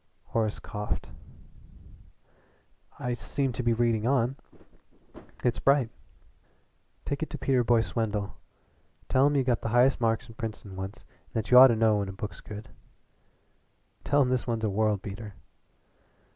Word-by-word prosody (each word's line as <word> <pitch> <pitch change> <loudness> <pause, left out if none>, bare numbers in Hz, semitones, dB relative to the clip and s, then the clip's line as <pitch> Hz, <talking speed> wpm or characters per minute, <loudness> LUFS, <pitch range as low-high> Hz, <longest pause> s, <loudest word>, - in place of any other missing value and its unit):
Horace 110 -2 0
coughed. 105 -6 -5 1.9
"I 125 0 -2
seem 125 +4 -2
to 125 - -3
be 120 -1 +1
reading 115 -1 +1
on. 130 -1 +2 1.1
It's 120 -2 +1
bright." 135 -4 +3 1.1
"Take 140 +1 -3
it 160 - -2
to - - -5
Peter 130 -2 +2
Boyce 115 -1 +1
Wendell. 105 -3 -1 0.7
Tell 130 +2 +4
him 145 - +1
you 135 - +3
got 125 -2 +1
the 115 - -2
highest 125 +3 +3
marks 115 -1 +1
in 115 - -12
Princeton 110 -4 -7
once 95 +2 -7 0.2
and - - -32
that 110 0 -2
you 125 - +10
ought 130 - +11
to 120 - +2
know 110 -1 +3
when 100 -1 -2
a - - -6
book's 105 +2 -7
good. 105 0 -9 1.3
Tell 145 0 +3
him 125 - -1
this 130 -1 0
one's 115 -2 -1
a 105 - +1
world 105 -1 +1
beater." 105 0 -7
115 Hz, 160 wpm, -28 LUFS, 105-125 Hz, 1.9 s, ought